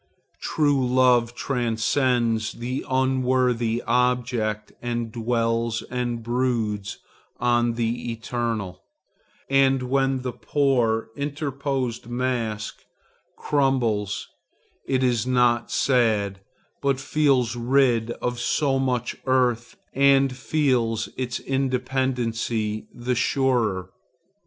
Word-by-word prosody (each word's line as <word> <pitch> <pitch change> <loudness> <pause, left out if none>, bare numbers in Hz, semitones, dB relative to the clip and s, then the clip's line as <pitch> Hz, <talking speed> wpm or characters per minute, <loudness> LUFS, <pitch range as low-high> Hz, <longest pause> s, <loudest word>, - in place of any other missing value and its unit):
True 145 -3 +1
love 125 -1 +3
transcends 120 -2 0
the 125 +3 -4
unworthy 130 -3 +1
object 120 -3 0
and 120 -1 -3
dwells 115 0 0
and 120 -2 -2
broods 115 -5 -1 0.4
on 120 -1 +2
the 120 +1 -2
eternal, 115 -5 -3 0.7
and 135 -1 +3
when 135 0 0
the 125 - -2
poor 120 -5 +1
interposed 140 -4 -3
mask 120 -4 -2 0.6
crumbles, 120 -8 0 0.6
it 130 -1 +1
is 120 -2 +1
not 120 -2 +2
sad, 110 -7 +1 0.4
but 140 -2 +1
feels 135 -4 +2
rid 120 -2 +2
of 120 0 -3
so 135 +2 +1
much 125 -2 -1
earth 125 -2 +1 0.2
and 135 -1 +4
feels 125 -6 0
its 125 -1 -3
independency 125 -5 -1
the 120 +1 -2
surer. 120 -7 +1
125 Hz, 90 wpm, -24 LUFS, 115-130 Hz, 0.7 s, and